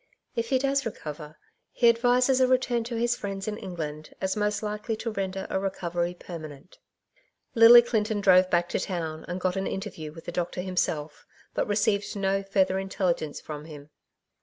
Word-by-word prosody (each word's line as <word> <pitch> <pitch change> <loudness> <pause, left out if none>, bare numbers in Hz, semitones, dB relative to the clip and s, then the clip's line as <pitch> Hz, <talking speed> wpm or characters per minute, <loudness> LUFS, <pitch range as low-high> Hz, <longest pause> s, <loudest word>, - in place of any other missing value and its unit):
If 230 +1 -2
lie 260 - +5
does 275 +1 +1
recover, 155 - -7 0.3
he 240 - +3
advises 250 +3 +4
a 255 - +5
return 250 -2 +1
to 235 0 -4
his 240 +1 +1
friends 195 -2 -5
in 210 0 -3
England 155 -4 -6
as 190 0 -1
most 210 0 -1
likely 210 +1 -3
to 230 +1 -4
render 195 -2 -3
a - - -1
recovery 175 -2 -2
permanent/' 155 -2 -10 0.7
Lily 235 +1 +9
Clinton 220 -3 0
drove 185 -2 +5
back 175 -1 +2
to - - -1
town 165 -4 -4
and 175 +1 -4
got 185 0 0
an 195 - -1
in - - -2
terview 170 -7 -7
with 165 +1 -12
the - - -4
doctor 175 +1 -2
himself, 165 -5 -2 0.3
but - - -1
^received 205 0 0
no 195 0 0
further 190 -1 +1
intelligence 185 -5 -2
from 150 -1 -8
him. 150 -2 -11
195 Hz, 180 wpm, -27 LUFS, 175-225 Hz, 0.7 s, Lily